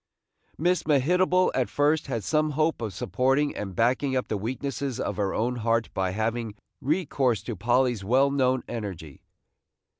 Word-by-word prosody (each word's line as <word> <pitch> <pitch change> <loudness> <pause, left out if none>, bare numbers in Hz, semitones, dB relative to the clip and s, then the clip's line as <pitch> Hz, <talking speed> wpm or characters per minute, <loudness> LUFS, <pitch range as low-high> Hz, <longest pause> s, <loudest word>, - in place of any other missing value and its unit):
Miss 175 +2 +1
Mehitable 180 +6 +3
at 130 -2 0
first 150 +2 +1
had 115 -5 -3
some 155 +5 +1
hope 155 -3 +1
of 110 -3 -3
supporting 135 +10 0
and 95 -3 -5
backing 130 +5 +1
up 130 - -1
the - - 0
weaknesses 130 +4 -3
of 100 -5 -3
her 100 -2 0
own 125 +3 -1
heart 115 0 0
by 95 -1 0
having 110 +2 -2 0.3
recourse 135 - 0
to 120 - -4
Polly's 120 +1 +1
well 130 +7 +3
known 130 -2 +1
energy. 95 - -6
125 Hz, 155 wpm, -26 LUFS, 110-145 Hz, 0.3 s, Mehitable